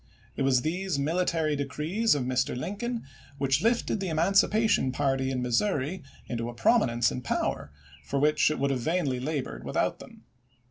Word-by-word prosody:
It - - -4
was 135 -2 +3
these 180 +1 -1
military 160 +1 0
decrees 150 +9 0
of 140 - -1
Mr. 130 0 0
Lincoln 225 - -4 0.3
which 135 +1 +1
lifted 230 -1 +1
the 190 - -3
emancipation 195 - +3
party 135 0 0
in 130 -2 -2
Missouri 145 - 0 0.3
into 115 -1 -3
a 120 - -8
prominence 120 - +3
and 125 - -5
power 95 -9 -2 0.3
for 140 - -3
which 150 +2 +3
it 155 - -2
would 140 0 0
vainly 135 +1 0
have 125 - -5
labored 150 -3 -3
without - - -1
them. - - -14
145 Hz, 165 wpm, -28 LUFS, 130-185 Hz, 0.3 s, was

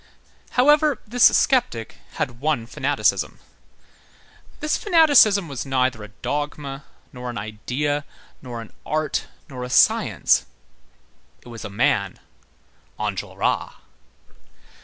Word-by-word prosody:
However, 295 +1 +4
this 245 +3 +3
sceptic 240 - +2 0.2
had 120 -1 -3
one 145 -4 0
fanaticism. 115 - 0 1.2
This 300 - 0
fanaticism 290 - +5
was 135 -5 -5
neither 130 -4 0
a - - -8
dogma, 145 +4 -5 0.3
nor 125 -1 -6
an 120 - -6
idea, 125 +8 -3 0.4
nor 120 -3 -7
an 115 - -13
art, 155 0 -1 0.2
nor 125 -2 -7
a 125 - -6
science; - - +3 1.0
it - - -13
was 115 -2 -9
a - - -6
man: 100 -2 0 0.8
Enjolras. - - -2
135 Hz, 105 wpm, -22 LUFS, 120-200 Hz, 1.2 s, fanaticism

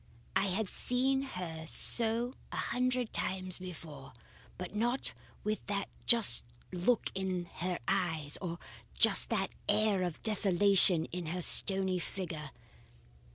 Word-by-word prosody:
I 195 +1 +2
had 195 +2 -3
seen 265 +2 0
her 180 -11 -7
so 235 +6 +1 0.2
a - - -6
hundred 250 -1 -1
times 185 -1 -3
before, 160 -6 -10 0.4
but 180 +1 -7
not 240 +5 -1 0.3
with 215 0 -2 0.5
just 230 - +6 0.3
that - - -7
look 205 +6 0
in 185 -2 -3
her 180 0 -3
eyes, 160 -7 -1
or 170 -2 -5 0.4
just - - +6
that - - -2 0.2
air 215 -3 +2
of 175 -3 -4
desolation 195 -4 +4
in 175 -2 -5
her 180 +3 -4
stony 190 0 +5
figure. 170 -5 -6
190 Hz, 125 wpm, -31 LUFS, 175-220 Hz, 0.5 s, just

